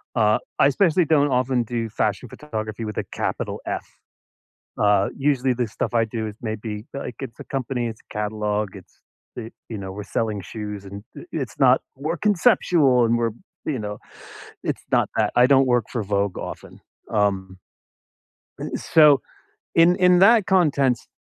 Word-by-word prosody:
Uh, 110 -2 +3 0.2
I - - +6
especially 170 +3 +3
don't 145 -2 +3
often 125 -1 +1
do 115 -1 -3
fashion 110 +2 -1
photography 110 -6 -6
with 105 - -6
a - - 0
capital - - -3
F. - - -3 1.0
Uh, 105 -1 +3
usually, 135 -2 +1
the 120 -1 -1
stuff 110 - -4
I 115 -1 +4
do 110 -1 -4
is 105 - -9
maybe, 110 0 -5
like, 130 -4 -6
it's 125 -5 -7
a - - -7
company, 130 -2 -3
it's 110 - -8
a - - -13
catalog, 105 -1 -2
it's 95 - -16 0.4
the 115 -1 -6 0.2
you 110 - -5
know, 95 -1 -6
we're 105 +1 -7
selling 105 -3 -2
shoes, 105 -1 -7
and 100 +1 -9
i - - -8
it's 135 -8 -4
not 130 -1 +5 0.2
"We're 155 +5 -3
conceptual 170 - +3
and 115 +1 +2
we're" 115 -2 0 0.3
you 145 -4 -1
know, 105 0 -5 0.7
it's - - -2
not - - +3
that. - - +1
I 125 +1 +7
don't 135 -1 +5
work 120 -3 +2
for 115 -4 -1
Vogue 100 -1 -1
often. - - -8 0.3
Um, 95 -3 0 1.2
so 150 -4 +5 0.5
in 170 +2 +6
in 180 -1 +5
that 215 0 +6
contents 145 -10 +2
120 Hz, 165 wpm, -23 LUFS, 105-140 Hz, 1.2 s, I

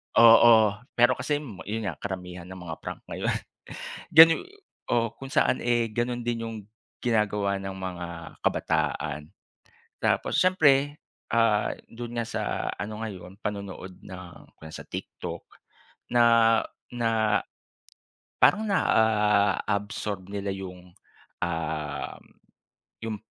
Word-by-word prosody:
Oo. 115 -2 +7 0.2
Pero 120 0 +5
kasi 150 - 0 0.3
'yon 110 +2 -2
nga 90 -6 -4
karamihan 90 -2 -6
ng 95 - -9
mga 80 -2 -5
prank - - -7
ngayon. - - -1 0.8
Ganu 165 +1 +8 0.5
oo 115 -2 +1
kung 135 0 -9
saan 130 - +2
eh, 120 -1 +2
gano'n 120 +1 -1
din 120 -1 -1
'yong 115 -1 -5 0.4
ginagawa 105 -4 +1
ng 95 0 -5
mga 90 -2 -5 0.4
kabataan. 75 -1 -1 0.7
Tapos - - +1
siyempre 145 -6 +4 0.4
ah, 115 -3 +3 0.2
do'n 120 +1 -7
nga 115 -1 -1
sa - - -3 0.4
ano 105 +2 -5
ngayon 95 -4 -7
panonood 100 -2 -5
ng 90 -2 -12
kung 80 0 -12
sa - - -8
TikTok - - -6 0.7
na 115 -1 +5 0.4
na, 115 -3 +1 1.0
parang 215 +1 +5
na-a-absorb 105 - +1
nila 100 0 -4
yung, 90 -2 -7 0.5
um, 80 -3 -3 0.8
yung 110 -1 -3
105 Hz, 110 wpm, -27 LUFS, 95-115 Hz, 1.0 s, Ganu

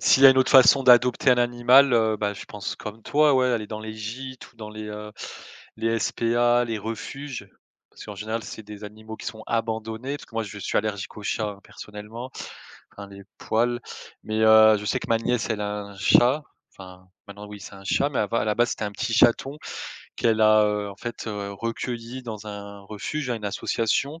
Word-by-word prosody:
s'il 135 - +4
y - - +14
a - - +10
une 130 - +2
autre 130 - +3
façon 135 0 +7
d'adopter 125 0 +5
un 125 - +4
animal, 120 +3 +5
heu, 110 -2 +3
bah 105 -1 -1
je 100 - -9
pense 105 -1 -6
comme 110 +1 -9
toi 150 -1 +4
ouais, 130 -1 +3
aller 115 -4 -1
dans 110 - -5
les 110 0 -7
gîtes 125 +5 -8
ou 115 - -32
dans 110 -2 -8
les, 110 0 -8
heu, 105 0 -7 0.6
les 115 0 0
SPA, 120 +2 +2
les 115 -2 -3
refuges, 120 +5 -6 0.4
parce - - -12
qu'en 105 -1 -8
général 110 +3 -3
c'est 110 - -9
des 105 0 -10
animaux 110 +1 -9
qui - - -10
sont 110 -3 -6
abandonnés, 115 +3 -2
parce - - -13
que 115 - -20
moi 115 - 0
je 105 0 -8
suis 100 - -3
allergique 105 -2 -4
aux 105 - -8
chats 105 -1 -2
personnellement, 105 +6 -9 0.6
enfin 100 0 -10
les 100 0 -12 0.2
poils, 120 +2 0 0.4
mais 110 0 -2
heu, 110 0 +7
je 105 - -7
sais - - 0
que - - -8
ma 115 - +4
nièce 120 0 -1
elle 110 -2 -1
a 105 0 -3
un 100 -1 -12
chat, 125 +9 +4 0.3
enfin 90 -1 -13 0.2
maintenant 100 +1 -10
oui 105 0 -10
c'est - - -10
un 95 - -13
chat, 140 +8 +1
mais 135 - -2
à 105 +1 0
la 105 - +1
base 120 0 +2
c'était 105 - -3
un 105 - -4
petit 115 +3 -3
chaton 125 +5 +3 0.6
qu'elle 110 -1 +2
a, 110 0 +6
heu, 105 -1 -1
en - - -10
fait, 120 +3 -7
heu, 100 -2 -4
recueilli 115 +3 -5
dans 110 -3 -7
un 100 -1 -8
refuge 110 +8 -5
hein, 120 - +1
à - - -3
une 105 - -10
association 115 +9 -1
110 Hz, 220 wpm, -25 LUFS, 105-120 Hz, 0.6 s, y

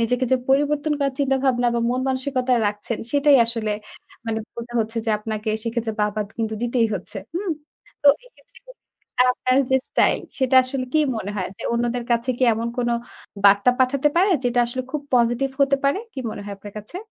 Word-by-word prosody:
নিজেকে 250 +3 +1
যে - - +6
পরিবর্তন 290 +2 +2
করার 275 -1 0
চিন্তাভাবনা 265 -3 +1
বা 235 - +1
মন 250 +1 0
মানসিকতা 260 -1 0
রাখছেন 210 +2 -3
সেটাই 285 -1 +5
আসলে 225 -2 -1 0.6
মানে 220 -1 -1 0.2
বলতে 235 +1 -8
হচ্ছে 225 +1 -3
যে 225 - +2
আপনাকে 215 0 -4
সেক্ষেত্রে 230 -1 -2
বাহবা 210 0 0 0.2
কিন্তু 220 -1 -1
দিতেই 240 -1 +2
হচ্ছে 195 +2 -6 0.2
হুম? 375 +1 -2 0.5
তো 290 - +7 0.2
এক্ষেত্রে - - -21 0.7
আপনার 255 0 0
যে 265 - +5
স্টাইল - - +3 0.2
সেটা 260 -1 +1
আসলে 255 0 -3
কি 310 - +4 0.2
মনে 205 -2 -4
হয়? 185 - -2
যে - - -10
অন্যদের 240 +1 -1
কাছে 235 +2 +1
কি - - -2
এমন 230 +1 -2
কোন 240 -1 +1 0.6
বার্তা 200 +4 +6
পাঠাতে 270 +3 +3
পারে 380 +4 +4
যেটা 245 0 +1
আসলে 255 +2 -4
খুব 300 - -1
positive 240 +3 +2
হতে 275 0 +4
পারে? 280 +8 +2
কী 265 - -5
মনে 205 - -7
হয় 205 - -6
আপনার 205 +1 -11
কাছে? 210 - -9
245 Hz, 180 wpm, -22 LUFS, 225-275 Hz, 0.7 s, তো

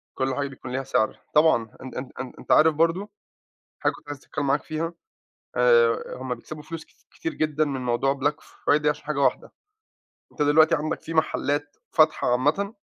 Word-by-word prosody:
كل 130 0 -1
حاجة 140 -1 -1
بيكون 130 -2 -9
ليها 135 +1 -2
سعر. 110 -4 0
طبعًا، 150 -6 +5 0.2
أن 130 - -9
أن 130 0 -5
أن 130 - -5
أنتَ - - -6
عارف 160 0 +6
برضو 170 +6 +1 0.7
حاجة - - +2
كنت - - -16
عايز 145 -1 -5
أتكلم 145 +1 -4
معاك 140 +2 +2
فيها، 165 +2 -3 0.6
آآ، 120 -1 +3
هُم 130 -1 -3
بيكسبوا 150 +5 -10
فلوس 165 0 -7
ك - - -38 0.3
كتير 165 - -4
جدًا 155 0 +1
من 135 -3 -3
موضوع 125 +3 +1
black 145 +2 +1
Friday 150 +1 0
عشان 150 0 0
حاجة 150 -1 -2
واحدة. 135 - +1 0.8
أنت 150 - -2
دلوقتي 155 +3 +5
عندك 155 0 -2
فيه 165 - -7
محلات 145 -2 0
فاتحة 155 -5 +3
عامةً 155 - +1
145 Hz, 180 wpm, -25 LUFS, 130-155 Hz, 0.8 s, عارف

